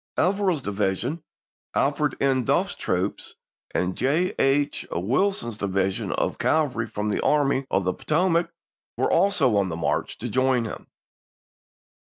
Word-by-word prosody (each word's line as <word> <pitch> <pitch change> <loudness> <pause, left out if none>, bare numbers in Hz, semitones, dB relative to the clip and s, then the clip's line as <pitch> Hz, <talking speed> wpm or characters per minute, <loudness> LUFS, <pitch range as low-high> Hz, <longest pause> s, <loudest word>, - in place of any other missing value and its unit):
Averill's 185 -5 +1
division, 100 - -1 0.5
Alfred 145 +1 +1
N. 135 -2 +2
Duffle's - - +1
troops, - - -2 0.3
and 90 0 -1
J. 155 +8 +1
H. 140 +1 +2
Wilson's 120 - 0
division 95 -2 -1
of - - -1
cavalry 135 -7 +1
from 105 0 -3
the 105 - 0
Army 140 -2 +2
of 95 - +1
the 90 0 0
Potomac 170 - +1 0.5
were - - +1
also 195 - +3
on 100 -2 +1
the 80 - -3
march 85 - -1
to - - -5
join 130 -2 +2
him. 110 - -7
130 Hz, 135 wpm, -25 LUFS, 100-155 Hz, 0.5 s, also